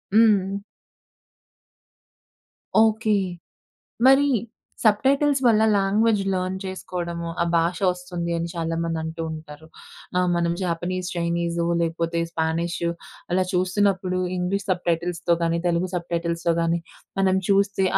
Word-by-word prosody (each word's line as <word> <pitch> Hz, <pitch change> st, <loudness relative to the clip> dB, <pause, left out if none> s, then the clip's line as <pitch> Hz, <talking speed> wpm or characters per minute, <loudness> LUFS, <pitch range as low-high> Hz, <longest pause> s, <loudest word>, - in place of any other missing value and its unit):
హ్మ్. 200 Hz, -3 st, +4 dB, 2.2 s
ఓకే. 220 Hz, -1 st, +3 dB, 0.9 s
మరి 270 Hz, +2 st, +6 dB, 0.6 s
sub 210 Hz, -2 st, +4 dB
titles 280 Hz, 0 st, +3 dB
వల్ల 220 Hz, -2 st, +5 dB
లాంగ్వేజ్ 205 Hz, +2 st, +2 dB
లెర్న్ 185 Hz, 0 st, -1 dB
చేసుకోవడము, 170 Hz, -2 st, -4 dB
ఆ -, -, +2 dB
భాష 170 Hz, +2 st, +1 dB
వస్తుంది, 180 Hz, -1 st, -4 dB
అని 170 Hz, +1 st, -2 dB
చాలా 165 Hz, -1 st, -2 dB
మంది 165 Hz, -1 st, -2 dB
అంటూ 160 Hz, +1 st, -5 dB
ఉంటారు. 155 Hz, 0 st, -10 dB, 0.5 s
ఆ! -, -, +4 dB, 0.2 s
మనం 170 Hz, 0 st, +1 dB
జాపనీస్, 180 Hz, +1 st, -2 dB
చైనీసో 170 Hz, 0 st, -1 dB, 0.2 s
లేకపోతే 165 Hz, 0 st, -1 dB
స్పానిషు 170 Hz, +1 st, -1 dB, 0.4 s
అలా 185 Hz, +1 st, +3 dB
చూస్తున్నప్పుడు 185 Hz, 0 st, +1 dB, 0.2 s
ఇంగ్లీష్ 180 Hz, +3 st, -1 dB
సబ్ 180 Hz, -1 st, -1 dB
టైటిల్స్‌తో 170 Hz, 0 st, +1 dB
గాని, 165 Hz, 0 st, +1 dB
తెలుగు 175 Hz, +2 st, 0 dB
సబ్ 175 Hz, -1 st, -3 dB
టైటిల్స్‌తో 170 Hz, 0 st, 0 dB
గాని 165 Hz, 0 st, +1 dB, 0.4 s
మనం 190 Hz, 0 st, +3 dB
చూస్తే 200 Hz, -1 st, +2 dB
180 Hz, 115 wpm, -24 LUFS, 170-195 Hz, 2.2 s, మరి